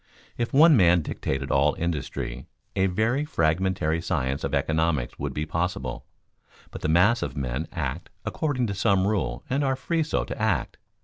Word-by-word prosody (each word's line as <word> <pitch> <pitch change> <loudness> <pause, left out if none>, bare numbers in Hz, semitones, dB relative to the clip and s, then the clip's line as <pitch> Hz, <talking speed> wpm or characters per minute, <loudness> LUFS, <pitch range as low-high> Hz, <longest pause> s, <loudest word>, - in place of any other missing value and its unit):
If 120 0 -2
one 155 +3 +7
man 90 -6 +5
dictated 70 -1 -3
all 70 +2 +3
industry, 75 -6 -4 0.3
a 95 0 +3
very 110 +9 +1
fragmentary 85 - 0
science 70 -6 -1
of 70 +1 -1
economics 80 -2 0
would - - -2
be 75 - -3
possible; 80 -6 -3 0.6
but - - -8
the - - -1
mass 95 +9 +4
of 70 +1 -4
men 70 +4 -2
act - - -4 0.2
according 145 -6 -1
to 100 - -2
some 100 -1 +2
rule 105 -1 -1
and 140 +1 0
are 135 -1 +1
free 165 +5 -1
so 155 - 0
to - - -6
act. 105 - 0
90 Hz, 170 wpm, -26 LUFS, 75-115 Hz, 0.6 s, one